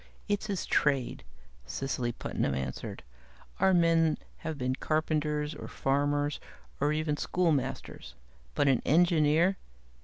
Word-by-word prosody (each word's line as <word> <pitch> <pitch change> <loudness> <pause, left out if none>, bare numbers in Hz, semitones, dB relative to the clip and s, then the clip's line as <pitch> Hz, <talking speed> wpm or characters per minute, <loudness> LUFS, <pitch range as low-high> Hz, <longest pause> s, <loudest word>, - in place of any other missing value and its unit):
"It's 205 0 -1
his 195 -5 -2
trade," 140 -4 +1 0.4
Cecily 125 - -2
Putnam 70 - -2
answered. 65 -1 -5 0.6
"Our 190 0 +4
men 165 -3 +4 0.2
have 160 -2 -5
been 130 -1 -1
carpenters, 150 0 0
or - - -8
farmers, 145 +1 0 0.4
or 145 +2 +2
even 155 -1 0
schoolmasters. 165 -4 -1 0.4
But 145 - +2
an 135 -3 +3
engineer. 165 +2 +4
150 Hz, 115 wpm, -30 LUFS, 140-165 Hz, 0.6 s, Our